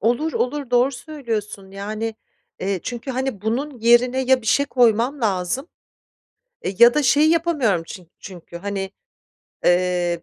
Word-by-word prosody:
Olur, 245 Hz, +9 st, 0 dB
olur, 275 Hz, 0 st, -2 dB
doğru 250 Hz, +3 st, +3 dB
söylüyorsun 230 Hz, -7 st, -5 dB
yani, 215 Hz, +3 st, -4 dB, 0.5 s
eee, 190 Hz, -2 st, -1 dB
çünkü, 245 Hz, +2 st, -5 dB
hani, 260 Hz, -5 st, -3 dB
bunun 255 Hz, +4 st, -2 dB
yerine 240 Hz, +3 st, +4 dB
ya 260 Hz, -1 st, +3 dB
bir -, -, -10 dB
şey 280 Hz, +5 st, +3 dB
koymam 245 Hz, +2 st, +2 dB
lazım. 215 Hz, -, -1 dB, 0.9 s
E, -, -, -2 dB
ya 235 Hz, 0 st, +8 dB
da 300 Hz, -, +2 dB
şeyi 290 Hz, +5 st, +4 dB
yapamıyorum 295 Hz, -, +1 dB
çin 180 Hz, -3 st, -11 dB
çünkü, 175 Hz, -2 st, -11 dB
hani, 195 Hz, 0 st, -4 dB, 0.7 s
eee, 175 Hz, -1 st, +1 dB
235 Hz, 140 wpm, -21 LUFS, 195-265 Hz, 0.9 s, ya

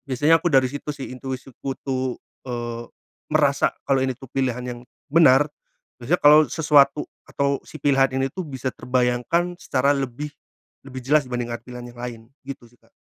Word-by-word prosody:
Biasanya 145 Hz, +5 st, +4 dB
aku 175 Hz, -, +1 dB
dari 130 Hz, -1 st, +5 dB
situ 145 Hz, +2 st, -5 dB
sih 135 Hz, -, -7 dB
intuisiku 130 Hz, +1 st, -6 dB
tuh, 130 Hz, -1 st, -2 dB, 0.3 s
eee, 120 Hz, -1 st, -4 dB, 0.5 s
merasa 145 Hz, -3 st, +3 dB, 0.2 s
kalau 135 Hz, -1 st, +3 dB
ini 130 Hz, -, 0 dB
tuh 130 Hz, -, -12 dB
pilihan 130 Hz, -2 st, -1 dB
yang 120 Hz, -1 st, -6 dB, 0.3 s
benar, 150 Hz, -2 st, +5 dB, 0.5 s
biasanya 140 Hz, +9 st, 0 dB
kalau 150 Hz, +1 st, +8 dB
sesuatu 150 Hz, -2 st, +4 dB, 0.2 s
atau 140 Hz, 0 st, 0 dB
si 155 Hz, -, -10 dB
pilihan 135 Hz, -2 st, +3 dB
ini 135 Hz, -, +2 dB
tuh 185 Hz, -, -4 dB
bisa 130 Hz, -2 st, -4 dB
terbayangkan 125 Hz, +8 st, 0 dB
secara 140 Hz, -2 st, +1 dB
lebih 135 Hz, +2 st, -4 dB, 0.6 s
lebih 130 Hz, -1 st, -7 dB
jelas 150 Hz, +2 st, +4 dB
dibandingkan 120 Hz, -2 st, -4 dB
pilihan 125 Hz, -1 st, -9 dB
yang -, -, -17 dB
lain, 120 Hz, -2 st, -6 dB, 0.3 s
gitu 135 Hz, -3 st, -8 dB
sih 120 Hz, -, -23 dB
Kak. 115 Hz, -, -29 dB
135 Hz, 165 wpm, -23 LUFS, 125-145 Hz, 0.6 s, kalau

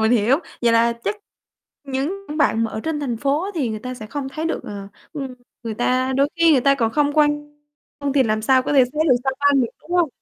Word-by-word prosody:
mình 220 Hz, +2 st, +3 dB
hiểu, 245 Hz, +4 st, +3 dB, 0.2 s
vậy 235 Hz, -1 st, +4 dB
là 230 Hz, +1 st, +4 dB
chắc 420 Hz, -, -1 dB, 0.7 s
những 285 Hz, +9 st, -3 dB
bạn 230 Hz, -6 st, +2 dB
mà 225 Hz, -, -3 dB
ở -, -, -4 dB
trên 320 Hz, -2 st, -2 dB
thành 255 Hz, -5 st, -2 dB
phố 280 Hz, +7 st, 0 dB
á 395 Hz, -, -4 dB
thì 285 Hz, -8 st, -1 dB
người 215 Hz, -1 st, -4 dB
ta 255 Hz, +2 st, -5 dB
sẽ 215 Hz, -3 st, -9 dB
không 275 Hz, +3 st, -5 dB
thấy 305 Hz, +4 st, -5 dB
được 330 Hz, -, -2 dB
ờ, 200 Hz, -1 st, -7 dB, 0.2 s
ừm, 270 Hz, -5 st, -5 dB, 0.3 s
người 225 Hz, -2 st, -4 dB
ta 255 Hz, +3 st, 0 dB
đôi 280 Hz, +1 st, +3 dB
khi 335 Hz, -1 st, +5 dB
người 270 Hz, -, +4 dB
ta 275 Hz, +2 st, +4 dB
còn 230 Hz, -4 st, 0 dB
không 290 Hz, -1 st, +2 dB
quan 295 Hz, 0 st, +1 dB, 0.4 s
tâm 285 Hz, -1 st, -1 dB
thì 275 Hz, -1 st, +4 dB
làm 215 Hz, -2 st, 0 dB
sao 260 Hz, +2 st, +4 dB
có 270 Hz, -, -2 dB
thể 270 Hz, -3 st, +6 dB
thấy 305 Hz, -, +1 dB
được 250 Hz, -, +6 dB
sao 265 Hz, -, +1 dB
băng 285 Hz, -1 st, +4 dB
được, 235 Hz, -, -1 dB
đúng -, -, -18 dB
hông? 345 Hz, -3 st, +3 dB
270 Hz, 260 wpm, -21 LUFS, 235-295 Hz, 0.7 s, thể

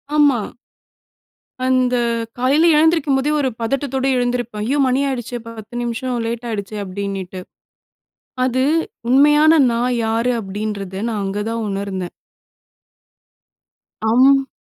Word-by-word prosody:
ஆமா. 290 Hz, -5 st, +4 dB, 1.3 s
அந்த 255 Hz, -1 st, +2 dB, 0.4 s
காலைல 280 Hz, +6 st, +3 dB
எழுந்திருக்கும் 310 Hz, -3 st, +3 dB
போதே 290 Hz, +3 st, 0 dB
ஒரு 270 Hz, -3 st, +1 dB
பதட்டத்தோட 270 Hz, +2 st, -1 dB
எழுந்திருப்பேன், 245 Hz, -3 st, -2 dB
ஐயோ! 280 Hz, -, +1 dB
மணி 255 Hz, +2 st, +1 dB
ஆயிடுச்சே 245 Hz, -2 st, -4 dB
10 225 Hz, 0 st, -10 dB
நிமிஷம் 240 Hz, +2 st, -3 dB
லேட் 235 Hz, +1 st, -4 dB
ஆயிடுச்சே 210 Hz, -1 st, -4 dB
அப்டின்னிட்டு. 190 Hz, -1 st, -5 dB, 1.0 s
அது 260 Hz, 0 st, +1 dB, 0.5 s
உண்மையான 295 Hz, +4 st, +5 dB
நான் 245 Hz, +2 st, 0 dB
யாரு? 230 Hz, +3 st, +1 dB
அப்டின்றத 200 Hz, -1 st, -5 dB
நான் 210 Hz, -3 st, -2 dB
அங்கதான் 210 Hz, +3 st, -3 dB
உணர்ந்தேன். 195 Hz, -2 st, -4 dB, 2.0 s
அம். 270 Hz, +4 st, +4 dB
245 Hz, 100 wpm, -19 LUFS, 210-270 Hz, 2.0 s, உண்மையான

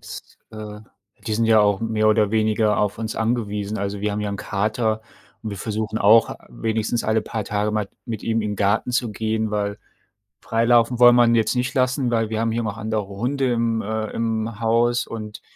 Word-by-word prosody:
Das -, -, -8 dB, 0.3 s
äh, 105 Hz, -1 st, -8 dB, 0.5 s
die 110 Hz, -, 0 dB
sind 115 Hz, +2 st, +1 dB
ja 110 Hz, -1 st, +5 dB
auch 100 Hz, -2 st, +2 dB
mehr 110 Hz, -1 st, +1 dB
oder 105 Hz, -1 st, +3 dB
weniger 110 Hz, -1 st, +2 dB
auf 105 Hz, -1 st, 0 dB
uns 110 Hz, -1 st, -4 dB
angewiesen. 110 Hz, -3 st, -2 dB
Also, 100 Hz, 0 st, -3 dB
wir 105 Hz, 0 st, -1 dB
haben 105 Hz, -, -3 dB
ja 105 Hz, -, -2 dB
'n 100 Hz, -, -4 dB
Kater 110 Hz, +3 st, -1 dB, 0.4 s
und 110 Hz, -, -4 dB
wir 100 Hz, -, -5 dB
versuchen 110 Hz, +2 st, -3 dB
auch, 110 Hz, +2 st, +5 dB
wenigstens 110 Hz, +1 st, -2 dB
alle 110 Hz, 0 st, +2 dB
paar 110 Hz, 0 st, -4 dB
Tage 105 Hz, +1 st, -1 dB
mal 105 Hz, -2 st, -2 dB, 0.2 s
mit 115 Hz, -4 st, -5 dB
ihm 115 Hz, 0 st, 0 dB
in 105 Hz, -, -2 dB
den 105 Hz, -, -4 dB
Garten 100 Hz, +5 st, +1 dB
zu 120 Hz, -2 st, 0 dB
gehen, 110 Hz, 0 st, -2 dB
weil 100 Hz, -1 st, -2 dB, 0.6 s
freilaufen 115 Hz, +1 st, +2 dB
wollen 120 Hz, 0 st, +8 dB
wir 120 Hz, 0 st, +6 dB
ihn 115 Hz, 0 st, +3 dB
jetzt 115 Hz, +3 st, +1 dB
nicht 125 Hz, 0 st, -1 dB
lassen, 130 Hz, -1 st, +1 dB
weil 115 Hz, -2 st, 0 dB
wir 110 Hz, 0 st, -2 dB
haben 115 Hz, 0 st, 0 dB
hier 115 Hz, +1 st, -1 dB
noch 110 Hz, 0 st, -4 dB
andere 110 Hz, -2 st, -2 dB
Hunde 125 Hz, +6 st, -1 dB
im 115 Hz, -1 st, 0 dB
äh, 110 Hz, +1 st, -3 dB
im 110 Hz, -1 st, -2 dB
Haus 120 Hz, +1 st, +1 dB
und, 110 Hz, -1 st, -7 dB
110 Hz, 210 wpm, -22 LUFS, 105-115 Hz, 0.6 s, wollen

